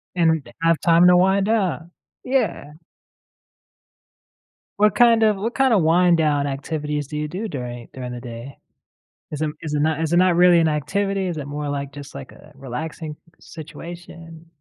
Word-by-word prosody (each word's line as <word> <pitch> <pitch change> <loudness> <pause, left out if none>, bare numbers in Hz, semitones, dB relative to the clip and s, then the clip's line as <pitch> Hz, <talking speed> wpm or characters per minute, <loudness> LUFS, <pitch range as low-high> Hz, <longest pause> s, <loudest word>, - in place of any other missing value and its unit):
And 160 -5 +1
have 165 -1 +2
time 170 +1 +5
to 180 - +6
wind 190 +2 +3
down, 190 -6 -1 0.3
yeah. 215 - -1 2.1
What, 210 +1 +3
kind 230 -2 +5
of 215 -2 +3
what, 230 +5 -3
kind 265 -2 +3
of, 200 - +4
wind 175 +2 +4
down 145 -3 +1
activities 150 +1 -4
do 150 - -6
you 150 0 -2
do 190 +8 -5
during 120 - -6
during 125 -1 -6
the 120 0 -7
day? 120 +2 -9 0.7
Is 150 0 -5
it 155 - 0
is 155 -2 -5
it 145 - 0
not 155 +1 0
is 160 0 -1
it - - +3
not 180 -1 +4
really 175 -1 +6
an 165 - +3
activity? 195 +6 -1
Is 175 - -3
it 145 -3 -5
more 145 +1 -5
like, 140 -1 -4
just, 145 0 -10
like 135 -1 -9
a 150 - -17
relaxing 150 +4 -6 0.2
situation? 165 0 -11
160 Hz, 175 wpm, -21 LUFS, 145-180 Hz, 2.1 s, to